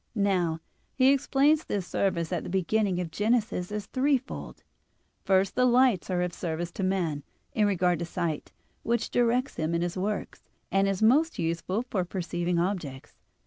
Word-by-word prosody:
Now, 180 -6 +1 0.3
he 265 +1 +5
explains 285 +3 +3
this 200 -3 -3
service 175 -3 -1
at 175 - -1
the - - -6
beginning 190 +1 +1
of 175 -3 -4
Genesis 210 -2 0
as 210 -1 -3
threefold. 270 0 -2 0.6
First, 195 0 +3
the 250 - +3
lights 245 -7 +3
are 180 -1 +1
of 180 -1 -3
service 170 0 -3
to 195 - -4
man, 175 -6 0 0.3
in 215 -6 +3
regard 180 -3 +1
to 170 - -2
sight, 165 -2 -3 0.3
which 235 0 -1
directs 245 +2 +1
him 160 +1 -1
in 170 - 0
his 175 +1 -3
works, 205 +2 -3 0.3
and 195 0 +3
is 195 +1 -1
most 295 +9 +4
useful 170 +6 -1
for 210 -7 -2
perceiving 175 -1 -2
objects. 170 -7 -3
190 Hz, 165 wpm, -28 LUFS, 175-230 Hz, 0.6 s, he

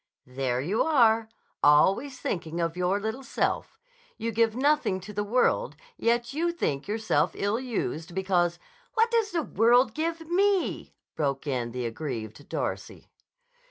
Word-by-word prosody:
"There 125 -1 -2
you 180 - 0
are! 230 -7 +4 0.3
Always 195 - +4
thinking 170 -5 -3
of 165 0 -1
your 180 +2 +1
little 220 +5 -4
self. 265 - -2 0.4
You 230 - -2
give 225 0 +2
nothing 285 -7 +2
to 200 +3 -10
the 205 +1 -1
world, 250 - +1 0.2
yet 235 - 0
you 335 +4 0
think 145 - -2
yourself 215 +1 +1
ill 205 +3 0
used 190 -9 -4
because—" 180 -3 +1 0.4
"What 455 +1 +3
does 455 -3 +2
the 335 -5 -1
world 240 +2 +3
give 330 +1 -2
me?" 385 +2 +1 0.2
broke 140 -2 -1
in 125 -4 -2
the 125 0 -4
aggrieved 115 0 -5
Darcy. - - -4
215 Hz, 145 wpm, -27 LUFS, 160-265 Hz, 0.4 s, are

